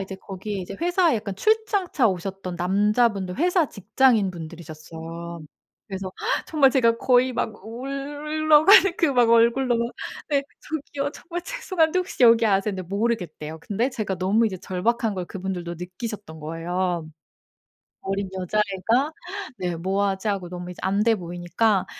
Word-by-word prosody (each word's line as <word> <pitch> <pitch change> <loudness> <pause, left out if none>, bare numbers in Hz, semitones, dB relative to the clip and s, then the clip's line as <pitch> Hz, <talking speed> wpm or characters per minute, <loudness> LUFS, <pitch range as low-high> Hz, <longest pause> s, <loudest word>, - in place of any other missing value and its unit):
이제 195 0 -5
거기에 195 +1 -6
이제 190 +2 -7
회사에 350 -5 +3
약간 205 -2 -4
출장차 405 - +2
오셨던 185 0 -4
남자분들 200 +1 +1
회사 350 -1 +2
직장인 215 0 +2
분들이셨어요. 165 0 -8 0.5
그래서 190 -1 -5 0.3
정말 280 -4 +4
제가 230 -3 +3
거의 255 0 +3
막 215 -4 -3
울러 290 +5 +1
가는 390 -1 +8
그 330 - +3
막 245 -2 +4
얼굴로 235 +2 +4
막 235 +1 -2 0.4
"네 280 -1 +2 0.2
저기요. 285 -2 -4
정말 345 0 -6
죄송한데 370 -7 0
혹시 365 -8 -2
여기 230 -1 +7
아세요?" 195 +1 +2
했는데 185 -2 -6
모르겠대요. 185 -7 -2
근데 230 +9 -1
제가 200 -5 -3
너무 210 +5 +3
이제 190 -3 -3
절박한 220 +5 -1
걸 180 -1 -3
그분들도 180 -3 -5
느끼셨던 185 -1 -7
거예요. 170 +1 -2 0.9
어린 195 0 -2
여자애가 210 - 0 0.5
네 180 -2 -2
"뭐 195 +4 0
하지?" 195 +2 -2
하고 190 -4 -2
너무 180 0 -7
이제 180 - -10
안 200 +2 +1
돼 230 -1 +4
보이니까 175 +3 0
205 Hz, 335 characters per minute, -24 LUFS, 185-260 Hz, 0.9 s, 가는